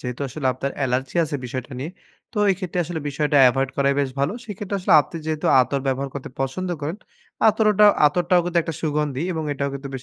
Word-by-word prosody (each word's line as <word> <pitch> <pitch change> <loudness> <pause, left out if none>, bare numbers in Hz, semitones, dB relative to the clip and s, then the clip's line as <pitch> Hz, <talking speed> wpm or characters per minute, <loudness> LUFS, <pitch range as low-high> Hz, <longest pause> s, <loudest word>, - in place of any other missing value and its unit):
যেহেতু 125 +1 -6
আসলে 135 +1 -4
আপনার 135 +2 -4
এলার্জি 130 +4 -2
আছে 145 -1 -3
বিষয়টা 130 +2 -6
নিয়ে, 150 +6 -4 0.4
তো - - -16
এই 190 - +3
ক্ষেত্রে 180 -2 -4
আসলে 165 0 -5
বিষয়টা 145 +1 0
এভয়েড 135 +1 0
করাই 140 0 +2
বেশ 135 -2 -1
ভালো। 140 +7 +1
সে 225 - -10
ক্ষেত্রে 200 -1 -4
আসলে 180 - +3
আপনি 150 +4 -7
যেহেতু 155 -1 -2
আতর 135 +2 0
ব্যবহার 135 +1 -1
করতে 135 -2 -6
পছন্দ 180 +8 -2
করেন, 155 +7 -3 0.5
আতরোটা 210 -1 +4 0.2
আতরটাও 175 +3 +2
কিন্তু 175 -1 0
একটা 165 - -5
সুগন্ধি 150 -2 -1
এবং 160 -1 -3
এটাও 140 0 -2
কিন্তু 140 0 -6
বেশ 130 - -6
145 Hz, 210 wpm, -22 LUFS, 135-175 Hz, 0.5 s, আতরোটা